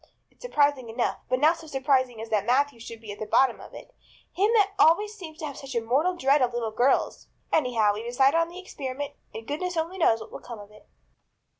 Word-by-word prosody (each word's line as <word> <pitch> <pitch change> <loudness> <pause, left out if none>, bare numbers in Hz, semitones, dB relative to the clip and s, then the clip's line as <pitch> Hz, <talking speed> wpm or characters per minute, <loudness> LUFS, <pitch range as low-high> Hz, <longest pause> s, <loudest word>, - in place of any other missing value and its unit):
It's - - -32
surprising 285 - +1
enough; 235 +2 -1
but 255 - +1
not 315 +4 +4
so 325 - -12
surprising 265 -4 0
as 225 0 -7
that 210 -3 +1
Matthew 270 0 +2
should 230 0 -9
be 215 -2 -8
at 205 - -9
the 215 - -5
bottom 265 0 +3
of - - -12
it, - - -12 0.4
him 405 +4 +2
that 410 -3 +4
always 415 +7 +4
seemed 335 -7 -10
to 315 - -5
have 285 -3 -7
such 270 -2 -8
a - - +3
mortal 275 +11 +1
dread 280 -2 +3
of 245 -1 +1
little 230 -2 -2
girls. 245 +5 +1 0.3
Anyhow, 230 -8 +2
we've 220 +3 -6
decided 270 +6 +3
on 335 0 0
the 350 - -11
experiment 285 -6 -6 0.2
and 220 +1 -8
goodness 345 +7 -3
only 335 +4 -2
knows 225 -9 +3
what - - -10
will - - -8
come 235 - -9
of 205 0 -13
it." 210 - -19
270 Hz, 235 wpm, -26 LUFS, 235-320 Hz, 0.4 s, not